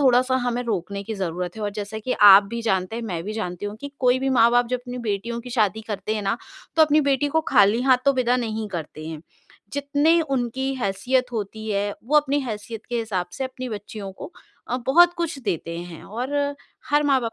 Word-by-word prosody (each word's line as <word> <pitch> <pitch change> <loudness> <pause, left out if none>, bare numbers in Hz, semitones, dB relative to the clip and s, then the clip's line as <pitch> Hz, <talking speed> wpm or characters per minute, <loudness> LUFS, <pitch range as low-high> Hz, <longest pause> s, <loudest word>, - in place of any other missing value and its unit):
थोड़ा-सा 255 -1 +4
हमें 245 0 0
रोकने 200 -3 -3
की 220 +2 -5
ज़रूरत 180 -1 -3
है 215 - -6
और 205 - -1
जैसे 215 +2 -6
कि 255 +4 -2 0.2
आप 195 +2 +9
भी 235 - -3
जानते 190 -1 0
हैं, 235 - -4
मैं 180 -7 -3
भी 210 - -4
जानती 205 -3 -4
हूँ 205 +1 -6
कि 285 0 -7
कोई 250 0 +3
भी 270 - -1
माँ-बाप 240 +1 +5
जब 250 - 0
अपनी 250 0 -6
बेटियों 230 +4 -2
की 250 +1 -10
शादी 220 -3 +1
करते 215 +2 -3
हैं 210 - -2
ना 195 +3 0 0.4
तो 320 - +7
अपनी 305 0 +4
बेटी 275 +2 +2
को - - +5
खाली 205 +4 +5
हाथों 265 +1 +4
विदा 250 -1 +2
नहीं 220 -3 -3
करते 155 -3 -6
हैं। 160 -2 -6 0.5
जितनी 285 +4 +2
उनकी 265 -2 -1
हैसियत 250 +4 0
होती 220 -1 -4
है, 205 0 -1
वो 295 +6 +2
अपनी 290 -1 +3
हैसियत 225 -3 -6
के 240 - -2
हिसाब 200 -6 -2
से 270 - -3
अपनी 255 -1 -6
बच्चियों 205 -1 -6
को 195 - -9 0.4
अ, 250 - 0
बहुत 345 +6 +6
कुछ 335 -4 -2
देते 170 -4 -3
हैं 175 -2 -8
और 245 +6 -5 0.6
हर 295 0 +4
माँ-बाप 260 -5 +2
230 Hz, 210 wpm, -23 LUFS, 200-260 Hz, 0.6 s, आप